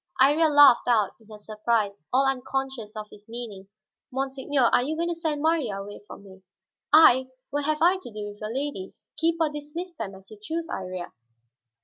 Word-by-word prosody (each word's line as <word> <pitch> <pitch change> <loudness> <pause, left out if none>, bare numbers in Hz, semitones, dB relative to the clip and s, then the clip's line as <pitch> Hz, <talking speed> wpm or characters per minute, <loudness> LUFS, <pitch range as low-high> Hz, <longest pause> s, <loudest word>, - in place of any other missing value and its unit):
Iría 295 +5 +5
laughed 290 -5 +7
out 220 -5 +3
in 220 - -22
her 215 -1 -11
surprise, 215 -1 -1
all 265 +2 +3
unconscious 265 -4 -3
of 215 -1 -5
his 210 +1 -16
meaning. 225 -5 -7 0.4
"Monseigneur, 270 +1 -1
are - - +5
you 295 +5 -2
going 340 +2 -1
to - - 0
send 315 -3 -3
Marya 315 -10 +1
away 205 +1 -9
from 200 - -11
me?" 190 -1 -15 0.5
"I! 260 -4 +7 0.2
What 290 0 -1
have 305 +1 0
I 360 +2 +5
to 370 - -11
do 210 -1 -6
with 205 +1 -13
your 215 +1 -4
ladies? 265 -7 -5
Keep 330 +1 +2
or 320 -2 +2
dismiss 300 +5 -7
them 195 -11 -6
as 190 +1 -17
you 215 - -12
choose, 330 +8 -4
Iría." 185 -2 -5
260 Hz, 195 wpm, -26 LUFS, 210-300 Hz, 0.5 s, laughed